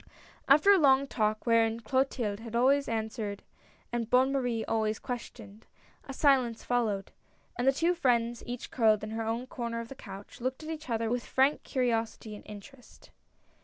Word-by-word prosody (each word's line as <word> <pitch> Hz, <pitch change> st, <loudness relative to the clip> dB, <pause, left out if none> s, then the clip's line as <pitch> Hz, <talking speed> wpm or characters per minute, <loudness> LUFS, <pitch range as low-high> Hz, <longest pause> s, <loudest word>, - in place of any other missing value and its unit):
After 305 Hz, +9 st, +6 dB
a 395 Hz, -, +6 dB
long 275 Hz, -2 st, +5 dB
talk, 215 Hz, -5 st, -1 dB
wherein 230 Hz, -1 st, +2 dB
Clotilde 235 Hz, -3 st, -1 dB
had 230 Hz, 0 st, -8 dB
always, 275 Hz, +4 st, +3 dB
answered 220 Hz, -2 st, -3 dB, 0.5 s
and 235 Hz, -2 st, -2 dB
Bonne 260 Hz, +2 st, +4 dB
Marie 245 Hz, -5 st, -1 dB
always 220 Hz, -1 st, 0 dB
questioned, 225 Hz, -3 st, -8 dB, 0.4 s
a -, -, -5 dB
silence 260 Hz, -5 st, +2 dB
followed, 220 Hz, -5 st, -1 dB, 0.4 s
and 245 Hz, -, -1 dB
the -, -, +7 dB
two 330 Hz, +6 st, +1 dB
friends, 240 Hz, -7 st, +1 dB
each 245 Hz, 0 st, -6 dB
curled 220 Hz, -3 st, +3 dB
in 215 Hz, -, -5 dB
her 225 Hz, +1 st, -3 dB
own 225 Hz, +3 st, -2 dB
corner 235 Hz, -2 st, -4 dB
of 230 Hz, 0 st, -7 dB
the -, -, -7 dB
couch, 200 Hz, -3 st, -11 dB
looked 260 Hz, +4 st, -3 dB
at 310 Hz, -, -7 dB
each 315 Hz, -3 st, -7 dB
other 225 Hz, -1 st, -1 dB
with 245 Hz, 0 st, -1 dB
frank 270 Hz, +3 st, +2 dB
curiosity 230 Hz, -4 st, -2 dB
and -, -, -12 dB
interest. 240 Hz, +5 st, -13 dB
235 Hz, 170 wpm, -30 LUFS, 220-265 Hz, 0.5 s, the